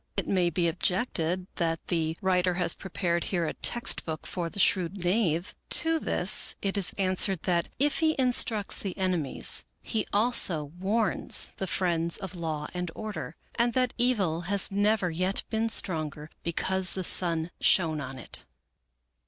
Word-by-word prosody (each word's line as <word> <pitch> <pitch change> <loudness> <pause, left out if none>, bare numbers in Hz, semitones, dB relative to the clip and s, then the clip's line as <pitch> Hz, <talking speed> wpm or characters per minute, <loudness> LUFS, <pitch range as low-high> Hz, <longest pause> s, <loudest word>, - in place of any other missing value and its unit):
It - - -1
may 180 -3 +2
be 170 +1 0
objected 180 0 -1
that 165 -2 -1
the 160 -2 0
writer 180 -1 +2
has 175 -2 +2
prepared 170 -3 -2
here 175 -3 -1
a - - -2
text 240 0 0
book 155 -2 -5
for 175 -2 -3
the 200 - -12
shrewd 185 -1 +1
knave. 180 -2 +1 0.2
To 325 0 +3
this - - +3
it 195 0 -2
is 200 -3 +3
answered 190 -2 +1
that, 175 -2 0
if 290 +3 +1
he 315 -1 +2
instructs 245 -5 +2
the 195 -3 -5
enemies, 180 -7 +1 0.2
he 220 -3 -2
also 195 -9 +2
warns 205 +1 0
the 190 - -3
friends 170 -2 +1
of 190 -3 -6
law 160 -4 -3
and 180 -1 -3
order; 215 -6 -6 0.2
and 235 0 +1
that 255 0 +1
Evil 200 -10 +1
has 200 -1 +2
never 205 -2 +2
yet 185 +4 -1
been 225 0 0
stronger 155 -6 -1
because 185 +2 0
the 190 - -3
sun 170 -1 +1
shone 160 -5 +3
on 130 -1 -7
it. 125 - -4
185 Hz, 160 wpm, -28 LUFS, 165-205 Hz, 0.2 s, To